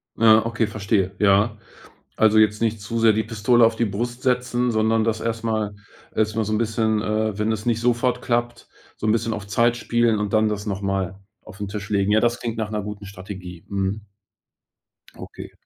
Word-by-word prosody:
Ja. 110 Hz, 0 st, +5 dB
Okay, 115 Hz, -1 st, 0 dB
verstehe. 100 Hz, -2 st, -1 dB
Ja. 105 Hz, +2 st, +3 dB, 0.6 s
Also, 110 Hz, 0 st, +4 dB
jetzt 105 Hz, 0 st, +3 dB
nicht 110 Hz, -1 st, 0 dB
zu 115 Hz, +3 st, -4 dB
sehr 115 Hz, -1 st, +6 dB
die 110 Hz, 0 st, 0 dB
Pistole 115 Hz, +2 st, +3 dB
auf 115 Hz, 0 st, 0 dB
die 120 Hz, -, +1 dB
Brust 120 Hz, +4 st, -4 dB
setzen, 125 Hz, -1 st, +1 dB
sondern 110 Hz, 0 st, +2 dB
das 110 Hz, -1 st, -1 dB
erst 115 Hz, 0 st, -3 dB
mal 110 Hz, -2 st, -1 dB, 0.4 s
erst 110 Hz, 0 st, 0 dB
mal 110 Hz, -, +1 dB
so 110 Hz, -, -3 dB
'n 110 Hz, -, +1 dB
bisschen, 110 Hz, -1 st, 0 dB
äh, 110 Hz, -1 st, -1 dB
wenn 105 Hz, +1 st, 0 dB
es 110 Hz, 0 st, -5 dB
nicht 115 Hz, -1 st, +1 dB
sofort 120 Hz, +1 st, +1 dB
klappt, 120 Hz, -1 st, -2 dB, 0.3 s
so -, -, -4 dB
'n 110 Hz, -, +4 dB
bisschen 115 Hz, 0 st, 0 dB
auf 105 Hz, -2 st, -5 dB
Zeit 120 Hz, +3 st, +2 dB
spielen 120 Hz, -1 st, +1 dB
und 105 Hz, -1 st, -2 dB
dann 110 Hz, -1 st, +3 dB
das 105 Hz, 0 st, -4 dB
noch 100 Hz, -2 st, -3 dB
mal 95 Hz, -1 st, -2 dB, 0.2 s
auf 105 Hz, -1 st, -13 dB
'n 100 Hz, -, -3 dB
Tisch 100 Hz, 0 st, -6 dB
legen. 100 Hz, 0 st, +1 dB
Ja, 110 Hz, -, +4 dB
das 120 Hz, 0 st, +1 dB
klingt 115 Hz, -1 st, -3 dB
nach 110 Hz, -1 st, -3 dB
'ner 105 Hz, -1 st, -2 dB
guten 105 Hz, 0 st, -7 dB
Strategie, 90 Hz, -3 st, -9 dB
mhm. 100 Hz, +1 st, -2 dB, 1.1 s
Okay. -, -, -10 dB
110 Hz, 205 wpm, -23 LUFS, 105-115 Hz, 1.1 s, sehr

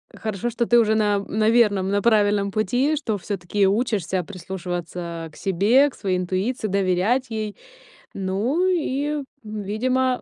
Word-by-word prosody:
Хорошо, 220 Hz, +1 st, -3 dB
что 235 Hz, +1 st, 0 dB
ты 240 Hz, -, +5 dB
уже 220 Hz, -1 st, +3 dB
на 205 Hz, -2 st, +2 dB
на 215 Hz, +2 st, 0 dB
верном, 205 Hz, -5 st, +3 dB
на 200 Hz, +1 st, +1 dB
правильном 205 Hz, -2 st, +3 dB
пути. 245 Hz, +9 st, +1 dB
Что 230 Hz, -8 st, -2 dB
всё-таки 195 Hz, +1 st, -1 dB
учишься 195 Hz, -4 st, 0 dB
прислушиваться 175 Hz, -2 st, -6 dB
к -, -, -19 dB
себе, 210 Hz, +10 st, +3 dB
к -, -, -17 dB
своей 185 Hz, -3 st, -1 dB
интуиции, 190 Hz, +6 st, -2 dB
доверять 195 Hz, +6 st, +1 dB
ей. 215 Hz, -2 st, -4 dB, 0.6 s
Ну 215 Hz, -, 0 dB
и 295 Hz, -4 st, -1 dB, 0.2 s
видимо 235 Hz, +5 st, -1 dB
210 Hz, 140 wpm, -23 LUFS, 190-240 Hz, 0.6 s, ты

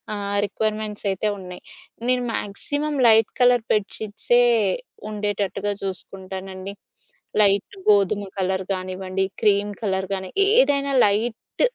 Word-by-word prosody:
ఆహ్, 200 Hz, 0 st, -2 dB
రిక్వైర్మెంట్స్ 215 Hz, 0 st, -3 dB
అయితే 190 Hz, +3 st, -2 dB
ఉన్నాయి. 180 Hz, -1 st, -10 dB, 0.5 s
నేను 250 Hz, -1 st, +2 dB
మాక్సిమం 290 Hz, +9 st, -3 dB
లైట్ 220 Hz, -1 st, +5 dB
కలర్ 245 Hz, -2 st, +4 dB
బెడ్ 210 Hz, -2 st, 0 dB
షీట్సే 220 Hz, +3 st, +2 dB, 0.6 s
ఉండేటట్టుగా 205 Hz, -1 st, -2 dB
చూసుకుంటానండి. 190 Hz, 0 st, -6 dB, 0.7 s
లైట్ 200 Hz, -, +3 dB
గోధుమ 205 Hz, 0 st, +4 dB
కలర్ 190 Hz, 0 st, 0 dB
కానివ్వండి, 185 Hz, 0 st, -2 dB, 0.2 s
క్రీమ్ 205 Hz, -1 st, +3 dB
కలర్ 190 Hz, -3 st, -1 dB
కాని 190 Hz, -1 st, -4 dB, 0.2 s
ఏదైనా 290 Hz, -, +3 dB
లైట్ 220 Hz, +3 st, -1 dB
205 Hz, 105 wpm, -23 LUFS, 190-220 Hz, 0.7 s, లైట్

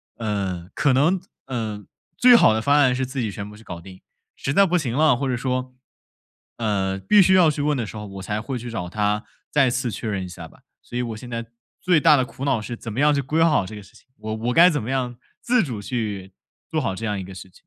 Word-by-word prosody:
呃 95 Hz, -5 st, -3 dB
可 140 Hz, -3 st, +2 dB
能， 165 Hz, +8 st, +3 dB, 0.2 s
呃 110 Hz, -5 st, -4 dB, 0.3 s
最 245 Hz, -1 st, +7 dB
好 110 Hz, -, +6 dB
的 110 Hz, -, 0 dB
方 140 Hz, +5 st, +3 dB
案 130 Hz, -4 st, +4 dB
是 130 Hz, 0 st, -1 dB
自 130 Hz, +1 st, -5 dB
己 110 Hz, -, -1 dB
全 100 Hz, +2 st, -6 dB
部 105 Hz, -, -12 dB
去 110 Hz, -, -15 dB
搞 85 Hz, -4 st, -8 dB
定， 95 Hz, +1 st, -13 dB, 0.3 s
实 135 Hz, -, -3 dB
在 200 Hz, +3 st, +6 dB
不 180 Hz, 0 st, +2 dB
行 130 Hz, -7 st, -3 dB
了， 150 Hz, -1 st, +4 dB
或 135 Hz, +2 st, -2 dB
者 125 Hz, -, 0 dB
说， 125 Hz, 0 st, -3 dB, 0.8 s
呃 100 Hz, -4 st, -1 dB
必 210 Hz, -, +5 dB
须 190 Hz, +1 st, +5 dB
要 175 Hz, -4 st, +6 dB
去 145 Hz, -, -4 dB
问 145 Hz, -1 st, +1 dB
的 115 Hz, -, -2 dB
时 105 Hz, -, -9 dB
候， 105 Hz, 0 st, -6 dB
我 95 Hz, -1 st, -8 dB
才 105 Hz, 0 st, -3 dB
会 130 Hz, +2 st, -4 dB
去 120 Hz, +1 st, -7 dB
找 90 Hz, -6 st, -4 dB
他 105 Hz, +1 st, 0 dB, 0.3 s
再 140 Hz, -4 st, +3 dB
次 125 Hz, 0 st, -1 dB
确 110 Hz, 0 st, -4 dB
认 95 Hz, -2 st, -2 dB
一 -, -, -7 dB
下 85 Hz, -2 st, -9 dB
吧， -, -, -21 dB, 0.2 s
所 120 Hz, -, -7 dB
以 -, -, 0 dB
我 115 Hz, -3 st, -4 dB
现 125 Hz, +2 st, -10 dB
在 115 Hz, -1 st, -4 dB, 0.4 s
最 180 Hz, -4 st, +3 dB
大 150 Hz, -, +6 dB
的 130 Hz, -, +2 dB
苦 135 Hz, -, -7 dB
恼 130 Hz, -6 st, +1 dB
是 120 Hz, +1 st, -6 dB
怎 115 Hz, -3 st, -7 dB
么 125 Hz, -, -3 dB
样 150 Hz, 0 st, +5 dB
去 140 Hz, -, +1 dB
规 155 Hz, +5 st, 0 dB
划 165 Hz, -, +5 dB
好 105 Hz, -11 st, +2 dB
这 110 Hz, -, -8 dB
个 105 Hz, -, -8 dB
事 -, -, -20 dB
情， -, -, -21 dB
我 110 Hz, 0 st, -5 dB
我 120 Hz, +3 st, -2 dB
该 175 Hz, +2 st, +7 dB
怎 145 Hz, -7 st, -1 dB
么 125 Hz, -, -4 dB
样 125 Hz, -2 st, -2 dB, 0.2 s
自 245 Hz, -1 st, +2 dB
主 115 Hz, -8 st, -5 dB
去 100 Hz, -5 st, -4 dB, 0.4 s
做 -, -, 0 dB
好 95 Hz, -, -2 dB
这 115 Hz, -, -5 dB
样 105 Hz, -2 st, -2 dB
一 -, -, -5 dB
个 95 Hz, +1 st, -10 dB
事 95 Hz, +1 st, -10 dB
情。 -, -, -30 dB
120 Hz, 290 characters per minute, -23 LUFS, 105-140 Hz, 0.8 s, 最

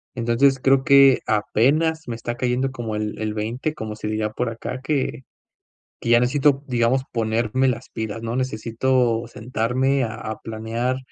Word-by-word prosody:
Entonces, 125 Hz, +3 st, +2 dB
creo 135 Hz, 0 st, +3 dB
que 140 Hz, -2 st, +6 dB
apenas 145 Hz, +10 st, +2 dB
me 115 Hz, -, -3 dB
está 120 Hz, +1 st, -4 dB
cayendo 125 Hz, +2 st, 0 dB
como 115 Hz, -4 st, -5 dB
el 105 Hz, 0 st, -3 dB
el 110 Hz, -1 st, -2 dB
veinte, 115 Hz, +8 st, -3 dB
como 110 Hz, -6 st, -5 dB
se 105 Hz, -, -6 dB
diría 110 Hz, 0 st, -1 dB
por 120 Hz, +1 st, -2 dB
acá, 120 Hz, +2 st, -6 dB
que 135 Hz, -1 st, -1 dB, 0.8 s
que 115 Hz, -, -3 dB
ya 120 Hz, -, +6 dB
necesito, 135 Hz, +3 st, +2 dB
digamos, 125 Hz, +1 st, +1 dB
ponerme 115 Hz, +3 st, 0 dB
las 120 Hz, 0 st, -4 dB
pilas, 110 Hz, 0 st, -5 dB
¿no?, 115 Hz, +1 st, -3 dB
necesito 120 Hz, -1 st, 0 dB
sentarme 125 Hz, +4 st, 0 dB
a 110 Hz, -, -3 dB
a 110 Hz, -1 st, -6 dB
planear, 115 Hz, +3 st, -3 dB
120 Hz, 160 wpm, -22 LUFS, 110-130 Hz, 0.8 s, que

